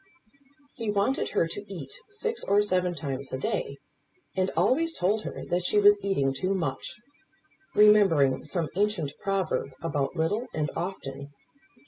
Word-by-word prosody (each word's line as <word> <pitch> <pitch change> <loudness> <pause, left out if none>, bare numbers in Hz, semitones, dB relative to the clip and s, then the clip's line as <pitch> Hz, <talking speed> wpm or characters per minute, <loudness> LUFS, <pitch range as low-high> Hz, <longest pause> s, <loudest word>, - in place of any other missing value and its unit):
He 230 -2 -4
wanted 205 +6 +1
her 165 - +1
to 205 - -6
eat 145 -8 -7 0.2
six 450 +3 -2
or 205 +1 +3
seven 180 -3 +1
times 140 -3 -4
a 130 - -2
day; 140 +1 -2 0.6
and 190 0 +1
always 325 +5 +2
told 205 +4 +1
her - - -6
that 175 0 +1
she 210 - +1
was 205 0 +6
eating 140 -9 +1
too 185 +8 -1
much, 180 -3 -3 0.8
remembering 195 -11 +5
some 160 +1 -2
ancient 200 -8 0
proverb 190 -9 -1
about 145 -2 -1
little 200 +9 0
and 150 -2 -1
often. 140 -6 -5
185 Hz, 145 wpm, -27 LUFS, 150-205 Hz, 0.8 s, was